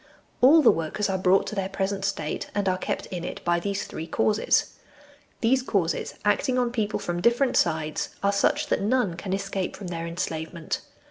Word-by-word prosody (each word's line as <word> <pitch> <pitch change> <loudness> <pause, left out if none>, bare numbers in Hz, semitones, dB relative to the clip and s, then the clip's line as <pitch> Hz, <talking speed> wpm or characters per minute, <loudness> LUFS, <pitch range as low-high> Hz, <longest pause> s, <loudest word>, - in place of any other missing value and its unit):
All 300 +5 +7
the 240 - +8
workers 165 +6 -2
are 190 - 0
brought 185 +1 +4
to - - -5
their 195 -2 -2
present 195 0 -2
state, 155 -6 -3
and 205 -1 0
are 185 0 +1
kept - - -3
in 175 -2 -4
it, - - -6
by 175 0 +2
these 200 +2 -2
three 160 - -6
causes. 215 +4 +2 0.7
These 255 +3 +3
causes, 195 -9 -1
acting 210 +5 +2
on 245 -1 +1
people 215 -4 -1
from 175 0 -3
different 240 +5 +3
sides, 160 -2 +1
are 200 - +4
such 295 +9 +2
that - - +1
none 210 -4 +1
can 185 +3 -6
escape 195 -1 -2
from 190 -4 -7
their 165 -1 -4
enslavement. 165 -1 -4
195 Hz, 190 wpm, -26 LUFS, 175-215 Hz, 0.7 s, the